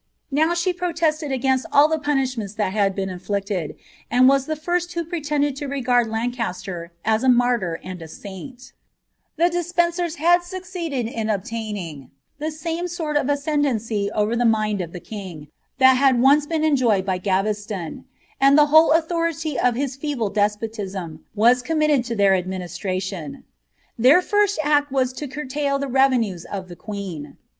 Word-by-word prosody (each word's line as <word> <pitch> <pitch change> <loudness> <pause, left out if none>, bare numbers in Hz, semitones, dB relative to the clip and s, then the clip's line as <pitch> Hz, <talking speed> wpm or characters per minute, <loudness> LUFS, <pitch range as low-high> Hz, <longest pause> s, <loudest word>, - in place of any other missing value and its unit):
Now 315 +5 +2
she 345 +1 0
protested 325 -4 -1
against 260 0 0
all 290 +1 +6
the 315 0 -1
punishments 260 -8 -1
that 210 -3 -1
had 200 -2 +1
been 195 -1 -2
inflicted, 190 -2 -3 0.3
and 250 +2 +5
was 275 0 +3
the 310 - -1
first 350 +3 -2
who 340 -1 -2
pretended 295 -4 -1
to 285 - -4
regard 250 -3 +1
Lancaster 220 -7 -4
as 220 +2 +2
a 260 - +4
martyr 240 -9 +2
and 185 -1 -7
a 165 - -8
saint 245 - -10 0.6
The 345 +2 +3
Despencers 345 -1 0
had 345 +3 +4
succeeded 350 - -4
in 225 -2 -3
obtaining 200 - -4 0.3
the 305 +1 -2
same 330 +3 -4
sort 325 -3 -4
of 290 -1 +1
ascend 290 +1 +1
ancy 220 -5 -1
over 210 +2 +1
the 240 - +1
mind 215 -3 +1
of 170 -2 -6
the 180 - -7
king 175 -8 -9 0.3
that 260 -1 +6
had 270 0 +4
been 240 - +1
once 285 +2 +5
enjoyed 275 - +2
by 185 -2 -1
Gaves 205 +3 -1
*on; 175 -6 -6 0.3
and 275 +1 +5
the 300 - +7
whole 315 0 +7
authority 330 -3 0
of 245 -2 +2
his 270 0 -2
feeble 275 -6 -2
despotism 205 -5 -2
was 240 +4 +4
committed 305 -1 +1
to 235 -1 -3
tlK^'ir 200 -2 +4
administration. 185 -2 -5 0.6
Their 275 +10 +6
first 410 0 +2
act 290 -1 +2
was 260 -2 +1
to 290 +3 -6
curtail 280 +1 -2
the 280 0 -3
revenues 250 -9 +2
of 190 -2 -6
the 175 - -9
queen. 195 -7 -7
255 Hz, 165 wpm, -22 LUFS, 205-300 Hz, 0.6 s, the